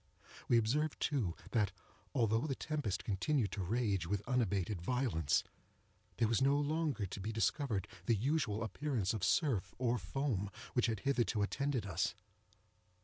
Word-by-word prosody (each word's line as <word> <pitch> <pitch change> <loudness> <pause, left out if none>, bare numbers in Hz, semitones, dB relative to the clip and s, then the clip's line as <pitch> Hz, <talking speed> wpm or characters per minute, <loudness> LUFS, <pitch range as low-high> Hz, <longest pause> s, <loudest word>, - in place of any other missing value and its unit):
We 120 - +5
observed 145 +7 +1
too, 120 - 0 0.2
that, 105 -5 +2 0.4
although 115 +2 +2
the 135 - -1
tempest 145 -13 -2
continued 110 +3 +1
to 100 - -3
rage 100 -3 0
with 100 +1 -2
unabated 100 -7 0
violence, 115 - +1 0.7
there 115 - +3
was 115 +3 +2
no 140 +1 +4
longer 145 -6 0
to 95 - -6
be 105 +4 -3
discovered 115 - 0 0.2
the 115 - +4
usual 115 -2 0
appearance 110 -2 -1
of 110 -4 -3
surf, 130 - +2
or 125 -1 +1
foam, 120 -9 -1 0.2
which 125 -1 +3
had 110 -4 -1
hitherto 120 -5 +1
attended 135 +1 -1
us. 95 -1 0
115 Hz, 145 wpm, -36 LUFS, 100-135 Hz, 0.7 s, We